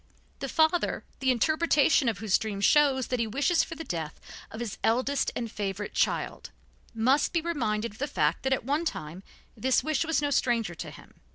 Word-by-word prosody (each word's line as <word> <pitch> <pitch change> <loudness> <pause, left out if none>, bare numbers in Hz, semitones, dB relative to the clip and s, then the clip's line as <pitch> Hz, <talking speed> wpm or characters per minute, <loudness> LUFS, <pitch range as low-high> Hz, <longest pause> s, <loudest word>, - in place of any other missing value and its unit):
The - - -4
father, 320 +2 +2 0.2
the 265 - +1
interpretation 305 +1 +3
of 220 - -3
whose 205 -1 +2
dream 210 -3 -4
shows 270 +3 +4
that 250 - -1
he 230 - 0
wishes 280 - +2
for 330 - -7
the 325 - -6
death 160 - -5 0.3
of 220 - -8
his 235 -4 -5
eldest 255 +5 +1
and 230 -2 -3
favorite 205 -1 -4
child, - - -1 0.5
must 255 +6 +2
be 340 - +3
reminded 235 -10 -1
of 210 - -16
the 285 - -1
fact 155 - 0
that 265 - -1
at 260 - -1
one 290 +5 0
time 165 - -5 0.3
this 255 +3 +1
wish 310 +1 0
was 325 -1 +1
no 290 -1 -1
stranger 235 -8 +1
to - - -7
him. - - -15
250 Hz, 195 wpm, -28 LUFS, 215-295 Hz, 0.5 s, shows